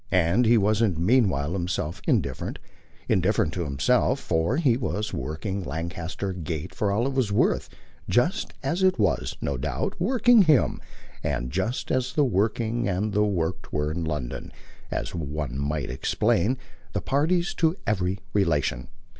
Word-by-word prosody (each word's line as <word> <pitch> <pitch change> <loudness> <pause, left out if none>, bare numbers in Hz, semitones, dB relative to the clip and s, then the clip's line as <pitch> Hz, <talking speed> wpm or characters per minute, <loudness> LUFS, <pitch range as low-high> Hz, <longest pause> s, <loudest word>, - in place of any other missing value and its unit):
And 95 +6 +3
he 120 +1 +6
wasn't 105 -3 +2
meanwhile 90 - +2
himself 85 -3 -2
indifferent 65 -2 0 0.5
indifferent 90 -3 +2
to 90 -2 -2
himself 125 - +2
for 85 - 0
he 140 -8 +3
was 105 -3 -2
working 95 +6 -3
Lancaster 85 +5 -4
Gate 80 -3 -5
for 105 -2 0
all 110 +5 +1
it 135 - -1
was 130 -6 +1
worth: 100 - +2 0.4
just 175 - +1
as 175 +3 -1
it 185 0 +4
was, - - 0
no - - -1
doubt, - - -2
working 245 -2 +5
him, 155 -8 +3 0.4
and 65 -4 -2
just 95 - -2
as 130 0 0
the 150 - +3
working 115 +1 0
and 100 +3 -1
the 105 0 +3
worked 90 -4 -2
were 75 0 0
in 85 +1 -3
London, 75 -6 -4 0.4
as - - -3
one 75 -4 -4
might 70 -2 -2
explain, 85 - +1 0.4
the - - -1
parties 170 +6 +1
to 165 0 +2
every 95 -3 0 0.2
relation. 75 -10 +1
95 Hz, 150 wpm, -26 LUFS, 80-120 Hz, 0.5 s, he